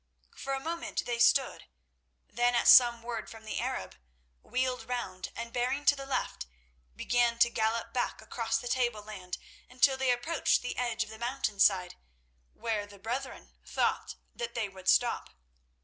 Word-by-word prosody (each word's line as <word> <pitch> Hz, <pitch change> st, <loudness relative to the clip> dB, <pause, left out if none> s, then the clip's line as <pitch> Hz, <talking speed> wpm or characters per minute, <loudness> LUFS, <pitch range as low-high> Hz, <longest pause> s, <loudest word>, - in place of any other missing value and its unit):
For 275 Hz, -, -4 dB
a 270 Hz, -, -1 dB
moment 335 Hz, +4 st, -3 dB
they 240 Hz, -1 st, -2 dB
stood; 265 Hz, +2 st, +3 dB, 0.6 s
then, 240 Hz, +1 st, +1 dB
at 235 Hz, -, +2 dB
some 240 Hz, -2 st, +8 dB
word 230 Hz, -2 st, -5 dB
from 225 Hz, -1 st, -12 dB
the 220 Hz, -, -3 dB
Arab, -, -, -4 dB, 0.4 s
wheeled 250 Hz, -2 st, -2 dB
round, 190 Hz, -7 st, -4 dB
and, 230 Hz, 0 st, -6 dB
bearing 255 Hz, +4 st, -1 dB
to 285 Hz, -, +6 dB
the 275 Hz, -1 st, -8 dB
left, 65 Hz, -, -2 dB, 0.5 s
began 240 Hz, -, +1 dB
to 235 Hz, 0 st, +4 dB
gallop 225 Hz, +1 st, -1 dB
back 250 Hz, -, -1 dB
across 225 Hz, -1 st, -2 dB
the 245 Hz, -, -6 dB
tableland, 215 Hz, -7 st, -2 dB, 0.3 s
until 260 Hz, +2 st, +3 dB
they 265 Hz, -1 st, 0 dB
approached 260 Hz, +6 st, +1 dB
the 245 Hz, -, -3 dB
edge 235 Hz, -2 st, -1 dB
of 215 Hz, -, -11 dB
the 220 Hz, -, -10 dB
mountainside, 205 Hz, -7 st, +1 dB, 0.6 s
where 215 Hz, -3 st, -2 dB
the 205 Hz, 0 st, -14 dB
brethren 245 Hz, +7 st, -5 dB
thought -, -, -1 dB, 0.2 s
that 235 Hz, 0 st, -5 dB
they 225 Hz, -3 st, -1 dB
would 190 Hz, -1 st, -4 dB
stop. 240 Hz, -1 st, +3 dB
235 Hz, 160 wpm, -30 LUFS, 220-250 Hz, 0.6 s, some